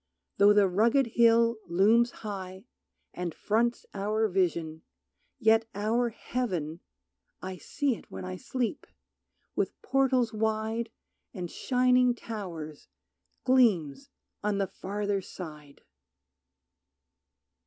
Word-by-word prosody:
Though 200 +1 +7
the 205 -1 +5
rugged 225 +9 +3
hill 230 -1 +4
Looms 215 +7 +4 0.2
high, 190 -1 -6 0.5
and 175 -3 -4
fronts 235 +3 0
our 215 +2 0
vision, 170 -4 -1 0.6
yet 225 -2 +3
our 225 +4 +1
heaven 180 -10 -3 0.6
(I 185 0 -6
see 275 +6 -1
it - - -15
when 95 -1 -7
I 90 0 -5
sleep) 245 - -3 0.7
with - - -1
portals 260 -4 +2
wide 220 +1 -1 0.5
And 180 -3 -5
shining 250 -1 +3
towers, 170 -11 -7 0.6
gleams 240 - +3 0.3
on 210 -1 0
the 200 - +1
farther 200 +1 -3
side. 150 -6 -10
210 Hz, 100 wpm, -29 LUFS, 180-235 Hz, 0.7 s, Though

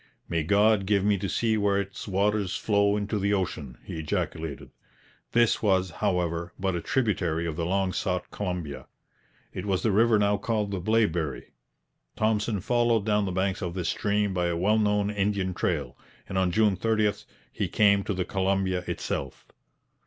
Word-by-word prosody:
'May 85 -1 0
God 100 +4 +3
give 100 -1 +2
me 105 0 +4
to 95 - -3
see 110 +2 +1
where 100 -1 +2
its 100 +1 -6
waters 100 0 0
flow 100 -1 +2
into 105 +1 -2
the 100 +1 +2
ocean,' 80 -9 -4
he 80 - -6
ejaculated. 80 -1 -3 0.6
This 120 -1 +3
was, 95 -4 +2
however, 85 0 -1
but 95 -1 0
a 85 - -2
tributary 105 -11 0
of 80 -2 -3
the 85 0 -2
long 95 0 0
sought 90 -2 -2
Columbia. 90 -8 -4 0.7
It 90 - -5
was 95 -2 0
the 110 - +2
river 110 +2 +4
now 105 0 +2
called 105 -1 -1
the 95 - -2
Blaeberry. 90 - 0 0.6
Thompson 110 -1 0
followed 120 -1 +2
down 105 -1 +2
the 95 - -2
banks 95 +2 -1
of 90 -2 -4
this 90 -2 -1
stream 105 -1 0
by 90 -1 0
a 85 -1 -1
well 105 +5 +2
known 105 -1 +1
Indian 100 -2 0
trail, 75 -8 -2 0.3
and - - -6
on 95 -1 +2
June 105 +1 +3
30 110 +1 +2 0.4
he - - -1
came 100 -2 +4
to 100 - -2
the 90 -1 -1
Columbia 95 -2 0
itself. 70 -2 -4
100 Hz, 175 wpm, -27 LUFS, 90-105 Hz, 0.7 s, me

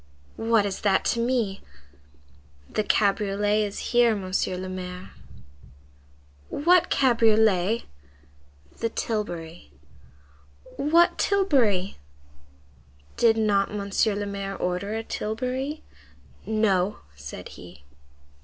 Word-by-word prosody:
"What 225 -2 +2
is 195 -2 -4
that 195 -2 +2
to 235 - -3
me?" 230 -5 0 1.1
"The 215 - -1
cabriolet 205 +1 +1
is 205 -1 -4
here, 240 -2 +5
Monsieur 185 -1 -2
le 185 +1 -5
Maire." 185 0 -7 1.4
"What 350 +4 +3
cabriolet?" 220 -4 +3 1.0
"The 230 - -1
tilbury." 175 - -4 1.1
"What 330 +5 +3
tilbury?" 260 - +2 1.2
"Did 225 -1 +3
not 205 -2 +1
Monsieur 200 +1 0
le 205 0 -3
Maire 200 -1 -5
order 180 +4 -2
a 225 - -3
tilbury?" 255 +8 -3 0.6
"No," 210 -3 +1
said 70 0 -9
he. 70 - -13
210 Hz, 95 wpm, -25 LUFS, 195-230 Hz, 1.4 s, here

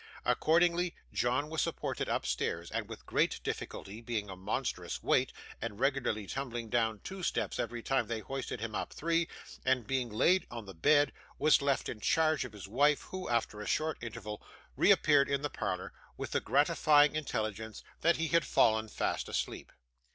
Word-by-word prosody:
Accordingly, 170 +2 +3 0.2
John 125 +4 +1
was 155 -2 -1
supported - - -2
upstairs, 85 +1 -1 0.2
with - - -9
great - - +1
difficulty; 105 +4 -5
being 110 -4 -3
a - - -6
monstrous 95 +3 -3
weight, - - +3 0.3
and 105 - -4
regularly 130 -6 0
tumbling 120 -1 -4
down 110 -2 +1
two 190 0 -6
steps - - -1
every 120 -1 -3
time 135 -4 +1
they 115 0 -2
hoisted 135 -2 -5
him 115 -1 -4
up - - -3
three; 165 +1 +1 0.4
and, 130 -3 +2
being 130 0 -1
laid 165 - +3
on 115 -3 -7
the 95 - -9
bed, 145 - +4 0.2
was 155 -1 +5
left 140 -1 +1
in 110 - -5
charge 155 +5 +2
of 120 - -9
his 100 -2 -9
wife, 145 +7 +3
who, 185 0 -6
after 115 -3 0
a 105 - -6
short 155 +1 0
interval, 105 -2 -6 0.3
reappeared 145 -2 +5
in 140 0 0
the 145 - -2
parlour, - - -3 0.2
with - - -5
the - - +1
gratifying 150 -1 +4
intelligence 110 -7 -3 0.2
that 170 0 +4
he 165 0 -1
had 170 -1 +4
fallen 110 -3 +3
fast - - -2
asleep. - - -3
130 Hz, 170 wpm, -32 LUFS, 110-150 Hz, 0.4 s, was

